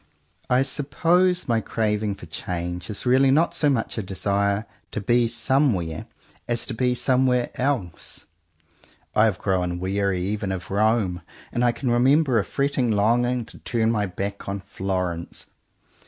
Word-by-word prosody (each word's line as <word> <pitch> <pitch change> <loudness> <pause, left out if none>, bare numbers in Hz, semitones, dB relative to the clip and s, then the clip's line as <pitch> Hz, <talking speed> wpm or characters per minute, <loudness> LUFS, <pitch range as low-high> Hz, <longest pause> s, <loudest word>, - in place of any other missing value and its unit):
I 125 +1 +4
suppose 170 +7 +1
my 115 -2 +2
craving 105 -2 -1
for - - -11
change 90 +2 -5
is 105 - -5
really 130 +2 +4
not 155 +5 +3
so 150 - +2
much 120 -4 -1
a - - 0
desire 100 +2 0 0.2
to - - -4
be 120 +3 +2
somewhere, 115 - 0 0.4
as 120 -1 -1
to 130 - -5
be 125 +2 +1
somewhere 125 -1 +2
else. 125 -10 -3 0.9
I 105 - +5
have 105 -4 +1
grown 90 -3 -1
weary 95 0 0
even 100 0 -2
of 95 0 -5
Rome 105 -3 +1 0.3
and 120 - 0
I 120 - +4
can 120 +1 -2
remember 130 +1 +4
a - - 0
fretting 140 +1 0
longing 120 +3 +2
to - - -13
turn 115 -1 0
my 105 -3 0
back 100 +2 -5
on 100 0 -3
Florence. 90 -3 -4
110 Hz, 155 wpm, -24 LUFS, 95-125 Hz, 0.9 s, I